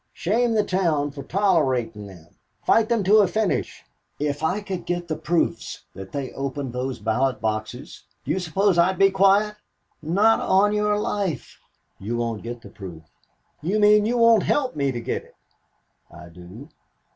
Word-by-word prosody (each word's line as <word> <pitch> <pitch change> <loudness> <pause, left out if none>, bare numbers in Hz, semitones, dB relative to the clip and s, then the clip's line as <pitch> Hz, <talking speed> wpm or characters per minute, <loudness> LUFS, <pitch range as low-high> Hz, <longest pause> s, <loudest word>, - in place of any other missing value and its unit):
Shame 230 +5 0
the 210 - +3
town 165 -7 0
for 140 0 -8
tolerating 130 - 0
them, 85 -4 -14 0.4
fight 225 0 +3
them 230 -3 +1
to 205 +4 +5
a 205 -2 +5
finish. 215 +1 -2 0.4
If 145 0 -2
I 180 +6 0
could 185 -4 -6
get 175 0 -2
the 155 - -2
proofs 160 +2 -2
that 95 0 -10
they 140 -3 -4
opened 135 -1 -4
those 130 +1 -3
ballot 120 +5 0
boxes, 110 +4 -5 0.2
do - - -2
you 190 - 0
suppose 185 +2 +1
I'd 185 +2 +3
be 195 +1 +5
quiet? 200 +2 +3 0.4
Not 200 +8 +3
on 205 +2 +3
your 210 0 +1
life." 200 -5 -3 0.4
"You 115 +5 -3
won't 115 -2 -2
get 120 0 -7
the - - -11
proof." 90 -5 -10 0.6
"You 190 +8 0
mean 210 0 +5
you 245 +2 0
won't 230 -2 +5
help 260 - 0
me 140 -2 0
to 120 - -4
get - - -3
it?" - - -22 0.7
"I 85 +1 -13
do." 90 - -12
165 Hz, 170 wpm, -23 LUFS, 125-205 Hz, 0.7 s, to